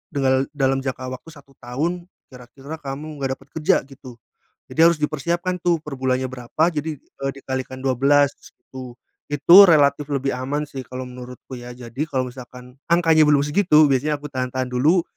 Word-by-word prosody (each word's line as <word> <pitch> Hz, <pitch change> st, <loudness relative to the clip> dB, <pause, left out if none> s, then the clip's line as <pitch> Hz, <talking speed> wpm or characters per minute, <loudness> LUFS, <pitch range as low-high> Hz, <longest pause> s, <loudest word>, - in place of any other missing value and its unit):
dengal 135 Hz, -1 st, +2 dB
dalam 135 Hz, -1 st, +1 dB
jangka 130 Hz, -1 st, -5 dB
waktu 130 Hz, -, -9 dB
1 140 Hz, -4 st, -15 dB
tahun 165 Hz, +9 st, -3 dB, 0.2 s
kira-kira 135 Hz, +5 st, -10 dB
kamu 145 Hz, +2 st, -7 dB
nggak 135 Hz, -1 st, -2 dB
dapat 135 Hz, -, -21 dB
kerja, 155 Hz, -1 st, +2 dB
gitu, 135 Hz, -2 st, -13 dB, 0.5 s
jadi 160 Hz, -, -4 dB
harus 170 Hz, -, -2 dB
dipersiapkan, 170 Hz, +4 st, -2 dB
tuh, 175 Hz, -1 st, +2 dB
per 150 Hz, -2 st, -8 dB
bulannya 130 Hz, 0 st, -1 dB
berapa, 130 Hz, +4 st, -2 dB
jadi, 150 Hz, 0 st, -3 dB
eee, 135 Hz, +1 st, -6 dB
dikalikan 130 Hz, -1 st, -6 dB
12 135 Hz, +2 st, +2 dB, 0.2 s
itu. 130 Hz, -2 st, -11 dB, 0.3 s
Itu 170 Hz, +7 st, +8 dB
relatif 145 Hz, -2 st, +3 dB
lebih 135 Hz, -1 st, -1 dB
aman, 140 Hz, +4 st, -3 dB
sih, 135 Hz, -2 st, -7 dB
kalau 130 Hz, 0 st, -7 dB
menurutku, 125 Hz, +1 st, -10 dB
ya, 120 Hz, -1 st, -9 dB
jadi 125 Hz, +2 st, -6 dB
kalau 130 Hz, -2 st, -1 dB
misalkan 125 Hz, 0 st, -12 dB, 0.2 s
angkanya 165 Hz, -2 st, +4 dB
belum 145 Hz, -1 st, +4 dB
segitu 155 Hz, -1 st, +4 dB
biasanya 145 Hz, +2 st, 0 dB
aku 150 Hz, -, -8 dB
tahan-tahan 130 Hz, -1 st, -3 dB
dulu 150 Hz, +9 st, +3 dB
135 Hz, 165 wpm, -21 LUFS, 130-150 Hz, 0.5 s, Itu